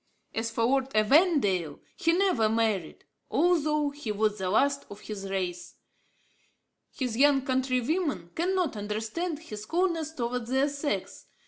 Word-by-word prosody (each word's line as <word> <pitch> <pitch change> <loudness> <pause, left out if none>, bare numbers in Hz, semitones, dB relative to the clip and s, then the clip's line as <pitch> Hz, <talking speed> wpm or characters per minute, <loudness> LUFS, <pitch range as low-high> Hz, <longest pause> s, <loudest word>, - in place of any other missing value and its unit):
As 225 +1 -1
for 225 0 -1
Lord 265 +2 +2
Evandale, 215 - +3 0.2
he 330 - +2
never 350 - +2
married, 220 -6 -1 0.2
although 305 -4 +2
he 285 -6 -5
was 210 0 0
the 185 -1 -1
last 280 +7 +2
of 205 +1 -10
his 195 -2 -6
race. 180 -2 -3 1.2
His 250 -4 -3
young 275 +1 +4
countrywomen 260 - 0
cannot 360 -4 0
understand 220 - -3
his 215 -9 -9
coldness 335 -3 0
towards 240 -3 -3
their 265 +3 +2
sex. 285 +1 -4
255 Hz, 130 wpm, -28 LUFS, 215-300 Hz, 1.2 s, young